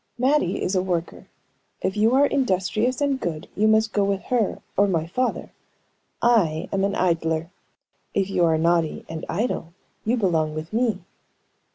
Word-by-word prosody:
Mattie 255 Hz, -7 st, +2 dB
is 185 Hz, -, -1 dB
a 185 Hz, -, +3 dB
worker; 175 Hz, -2 st, -3 dB, 0.6 s
if 190 Hz, -, 0 dB
you 220 Hz, +4 st, +3 dB
are 280 Hz, +2 st, +5 dB
industrious 245 Hz, -1 st, 0 dB
and 280 Hz, -2 st, +1 dB
good, 160 Hz, -7 st, -4 dB
you 215 Hz, +2 st, +3 dB
must 220 Hz, 0 st, +3 dB
go 205 Hz, -, +2 dB
with 195 Hz, -1 st, -1 dB
her 230 Hz, -5 st, +1 dB, 0.2 s
or 200 Hz, +1 st, +4 dB
my 165 Hz, -4 st, 0 dB
father. 250 Hz, +9 st, -2 dB, 0.7 s
I 185 Hz, -9 st, +3 dB
am 195 Hz, 0 st, +1 dB
an 200 Hz, 0 st, 0 dB
idler; 165 Hz, -1 st, 0 dB, 0.6 s
if 195 Hz, -1 st, +1 dB
you 190 Hz, -3 st, +1 dB
are 160 Hz, -1 st, +3 dB
naughty 165 Hz, -1 st, +1 dB
and 160 Hz, 0 st, -6 dB
idle, 175 Hz, -4 st, -2 dB, 0.3 s
you 235 Hz, +3 st, +1 dB
belong 160 Hz, -7 st, +1 dB
with 155 Hz, +5 st, -6 dB
me." 225 Hz, -5 st, +1 dB
195 Hz, 165 wpm, -24 LUFS, 165-225 Hz, 0.7 s, are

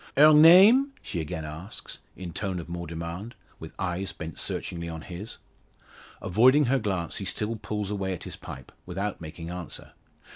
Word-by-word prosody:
"Her 155 Hz, +2 st, +9 dB
name?" 195 Hz, -, +8 dB
she 85 Hz, -, -3 dB
again 80 Hz, 0 st, -5 dB
asks, 80 Hz, +6 st, -8 dB, 0.2 s
in 90 Hz, -3 st, -7 dB
tone 95 Hz, -1 st, -2 dB
of 85 Hz, -, -6 dB
more 85 Hz, 0 st, -5 dB
demand, 85 Hz, +7 st, -6 dB, 0.2 s
her 80 Hz, -, -8 dB
eyes 95 Hz, +1 st, -2 dB
bent 80 Hz, -2 st, -7 dB
searchingly 85 Hz, -1 st, -3 dB
on 80 Hz, -1 st, -6 dB
his. 95 Hz, +6 st, -7 dB, 0.9 s
Avoiding 130 Hz, +10 st, +5 dB
her 135 Hz, +2 st, +2 dB
glance, 95 Hz, -6 st, -2 dB
he -, -, -5 dB
still 110 Hz, +2 st, -2 dB
pulls 105 Hz, -2 st, -4 dB
away 95 Hz, -2 st, -2 dB
at 90 Hz, -, -7 dB
his -, -, -7 dB
pipe, 65 Hz, -, -10 dB, 0.2 s
without 95 Hz, +2 st, -3 dB
making 80 Hz, +1 st, -7 dB
answer. 90 Hz, -1 st, -7 dB
95 Hz, 170 wpm, -27 LUFS, 85-110 Hz, 0.9 s, Her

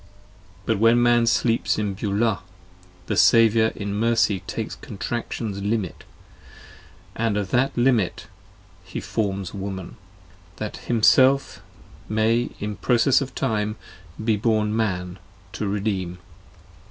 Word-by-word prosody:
But 110 Hz, -3 st, 0 dB
when 115 Hz, +2 st, +5 dB
Man 120 Hz, -1 st, +3 dB
sleeps 115 Hz, 0 st, +1 dB
in 105 Hz, -2 st, -1 dB
Beulah, 105 Hz, +2 st, 0 dB, 0.7 s
the -, -, -2 dB
Saviour 115 Hz, -1 st, +5 dB
in 100 Hz, -1 st, -4 dB
Mercy 110 Hz, -2 st, +2 dB
takes -, -, -4 dB
Contraction's 110 Hz, -1 st, -5 dB
Limit, 100 Hz, -3 st, -2 dB, 1.1 s
and 110 Hz, -2 st, 0 dB
of 100 Hz, -2 st, -3 dB
the 125 Hz, +3 st, +3 dB
Limit 120 Hz, -7 st, +1 dB, 0.6 s
he -, -, -6 dB
forms 100 Hz, -4 st, -3 dB
Woman; 95 Hz, +1 st, -6 dB, 0.6 s
That 105 Hz, -, -5 dB
Himself 130 Hz, +4 st, +3 dB, 0.5 s
may 110 Hz, +2 st, +1 dB
in 105 Hz, -1 st, -4 dB
process 125 Hz, +7 st, +3 dB
of 135 Hz, -, -5 dB
time 110 Hz, -4 st, -1 dB, 0.5 s
be 110 Hz, -2 st, +2 dB
born 110 Hz, 0 st, +1 dB
Man 90 Hz, -4 st, -2 dB, 0.3 s
to 100 Hz, +2 st, -3 dB
redeem. 100 Hz, -3 st, -2 dB
110 Hz, 115 wpm, -23 LUFS, 100-115 Hz, 1.1 s, when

